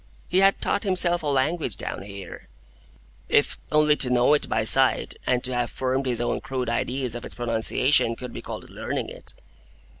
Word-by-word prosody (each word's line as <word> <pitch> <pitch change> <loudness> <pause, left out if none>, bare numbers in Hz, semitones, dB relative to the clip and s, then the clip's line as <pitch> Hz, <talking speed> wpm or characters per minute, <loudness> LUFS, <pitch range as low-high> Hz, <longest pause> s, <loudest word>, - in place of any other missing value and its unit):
He 180 - +3
had 195 0 +4
taught 200 - 0
himself 180 -3 +3
a 155 - -4
language 140 - 0
down - - -5
here,—if 100 -1 -5
only 150 0 +4
to 125 - 0
know 125 +3 +3
it 150 - 0
by 110 - 0
sight, 130 +4 +4
and 125 -1 +1
to 130 - -3
have 120 -1 -1
formed 130 +1 -2
his 120 -2 0
own 120 - -1
crude 130 -3 -4
ideas 125 +1 -2
of 120 - -6
its - - -7
pronunciation, 115 +1 +1
could 125 +1 -8
be - - -7
called - - -8
learning - - -4
it. - - -8
130 Hz, 180 wpm, -24 LUFS, 120-150 Hz, -, had